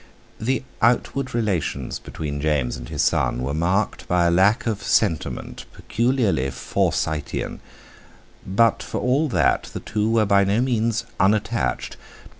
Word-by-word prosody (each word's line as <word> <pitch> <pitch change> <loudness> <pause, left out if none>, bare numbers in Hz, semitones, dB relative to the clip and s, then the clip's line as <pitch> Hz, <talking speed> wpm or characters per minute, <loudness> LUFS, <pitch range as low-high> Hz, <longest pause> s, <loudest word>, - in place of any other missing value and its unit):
The 130 +4 -1 0.2
outward 125 +2 +1
relations 105 -9 -1
between 70 -2 -5
James 75 -5 0
and - - -9
his - - -1
son 60 - +1
were 70 +2 -2
marked 90 +7 0
by 90 -1 +2
a 85 - +3
lack 95 +5 +3
of 110 -3 -1
sentiment 85 -9 -1
peculiarly 115 - 0
Forsytean, 75 +2 -2 0.8
but 115 +4 +2
for - - -4
all 140 +5 +1
that - - +2
the - - -2
two 105 +1 -1
were 115 -1 +3
by 100 0 +4
no 100 +3 +1
means 115 -2 0
unattached. 95 - 0
100 Hz, 135 wpm, -22 LUFS, 80-115 Hz, 0.8 s, by